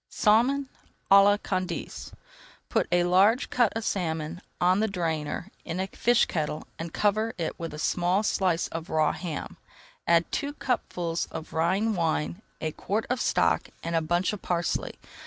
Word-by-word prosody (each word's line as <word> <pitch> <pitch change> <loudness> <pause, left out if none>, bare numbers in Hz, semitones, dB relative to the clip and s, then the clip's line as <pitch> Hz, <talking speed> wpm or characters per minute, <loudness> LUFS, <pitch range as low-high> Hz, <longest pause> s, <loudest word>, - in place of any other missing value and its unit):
SALMON 255 +6 +3 0.4
À 195 0 +9
LA 205 +1 +5
CANDACE 185 -4 -4 0.6
Put - - +1
a 175 0 +4
large 195 +8 +3
cut 240 -4 +3
of 225 - -4
salmon 165 -2 -2 0.2
on 180 +2 +3
the 220 - +2
drainer 170 -1 -3
in 165 - -4
a 190 - 0
fish 240 +4 +2
kettle 155 -2 -3
and 165 0 -5
cover 215 +4 +1
it 165 -2 -3
with 165 -1 -4
a 150 - -7
small 180 +5 +1
slice 185 -5 +1
of 165 0 -6
raw 155 -1 +2
ham. 165 -5 -5 0.5
Add 170 0 +3
two 285 +1 -2
cupfuls 175 - -2
of 160 0 -8
Rhine 190 +7 +1
wine, 85 - -1 0.2
a 155 - -2
quart 210 +7 -2
of 250 - 0
stock, - - +2
and 170 0 -2
a 165 - +3
bunch 175 +5 0
of 210 - -6
parsley. 175 -1 -1
180 Hz, 165 wpm, -27 LUFS, 165-210 Hz, 0.6 s, À